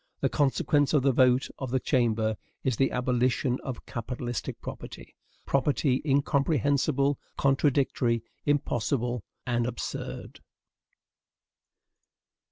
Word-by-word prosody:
The - - +2
consequence 145 +1 +2
of 140 - +3
the 135 - +4
vote 130 +1 +4
of 130 - -4
the 130 +2 +1
Chamber 115 -4 +1 0.3
is 130 -3 +1
the 135 - +3
abolition 125 +1 +1
of 130 -3 -6
capitalistic 120 +1 -4
property, - - -9 0.3
property 140 -1 +1
incomprehensible, 140 -1 +2 0.2
contradictory, 135 -4 +2 0.2
impossible, 125 -4 0 0.2
and 120 -1 0
absurd. 120 -2 -5
130 Hz, 95 wpm, -28 LUFS, 120-140 Hz, 0.3 s, the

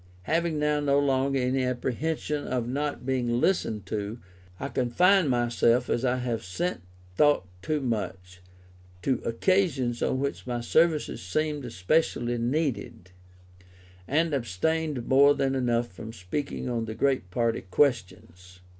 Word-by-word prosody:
Having 165 - 0
now 150 0 +1
no 140 -1 +2
longer 135 -1 +2
any 130 +1 +1
apprehension 145 +4 -2
of 125 -2 -1
not 145 +1 -3
being 120 -2 0
listened 110 - 0
to, 105 +2 -4 0.4
I 140 - -4
confined 170 +9 +3
myself, 120 0 +2
as 120 - 0
I 125 -1 +2
have 120 -3 -2
since 175 - -2 0.4
thought 145 -9 +4 0.2
too 150 +6 -1
much, 95 -6 -4 0.6
to 130 - +1
occasions 130 -3 +1
on 130 - 0
which 140 -1 -3
my 120 -1 -2
services 160 +5 +1
seemed 145 - -2
specially 120 - 0
needed, 120 - -2 1.0
and 160 +2 +1
abstained 140 - -1
more 140 +2 +6
than 135 -1 0
enough 120 -2 0
from 110 +5 -9
speaking 115 +10 -4
on 115 -2 -1
the 110 0 -6
great 130 -6 0
party 115 +4 0
questions. 90 - -1
125 Hz, 135 wpm, -27 LUFS, 115-145 Hz, 1.0 s, more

